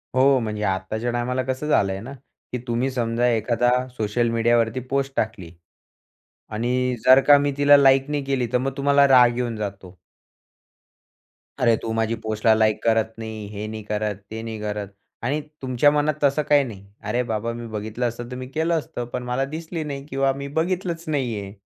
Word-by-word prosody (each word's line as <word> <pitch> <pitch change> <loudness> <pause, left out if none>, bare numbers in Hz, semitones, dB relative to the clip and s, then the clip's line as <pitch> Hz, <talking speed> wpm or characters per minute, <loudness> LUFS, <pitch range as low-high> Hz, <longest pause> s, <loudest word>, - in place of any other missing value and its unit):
हो 135 +1 +5
म्हणजे 105 -2 -3
आत्ताच्या 105 +5 -2
टाईमाला 125 +2 -1
कसं 130 +3 -3
झालंय 95 -9 +2
ना 130 +5 -8 0.4
की 125 - -2
तुम्ही 120 +3 0
समजा 120 -1 0
एखादा 120 +2 +1 0.3
सोशल 110 +2 0
मीडियावरती 115 +1 +2
पोस्ट 135 0 0
टाकली 105 -6 -3 1.0
आणि 125 +3 0
जर 130 +1 +8
का 145 -1 +8
मी 145 0 0
तिला 145 0 +7
लाइक 135 0 +4
नाही 145 -2 -1
केली 135 -3 0
तर 125 - +3
मग 135 +2 -2
तुम्हाला 140 0 +4
राग 125 -2 +6
येऊन 120 -2 -2
जातो. 95 -3 -7 1.6
अरे, 115 -2 +4
तू 110 - -4
माझी 115 0 0
पोस्टला 110 0 +2
लाइक 110 -1 +2
करत 110 -1 +2
नाही, 110 -2 -6
हे 105 0 -6
नाही 110 0 -6
करत, 105 0 -2 0.2
ते 110 - -5
नाही 110 -1 -6
करत 105 -1 -3 0.4
आणि 140 +6 0 0.2
तुमच्या 130 +2 +3
मनात 150 +1 +1
तसं 140 +2 +3
काही 145 -1 +5
नाही. 105 -6 -9 0.2
अरे, 125 - 0
बाबा 115 0 -3
मी 120 0 -7
बघितलं 110 +4 -2
असतं 120 +1 -6
तर - - -5
मी 130 0 -6
केलं 160 +5 -1
असतं, 155 -6 -5
पण 125 - -3
मला 125 +2 -1
दिसली 165 0 -5
नाही 140 -2 -6
किंवा 135 -2 +1
मी 140 - -4
बघितलंच 175 -1 -2
नाहीये. 120 -10 -2
120 Hz, 180 wpm, -23 LUFS, 110-135 Hz, 1.6 s, जर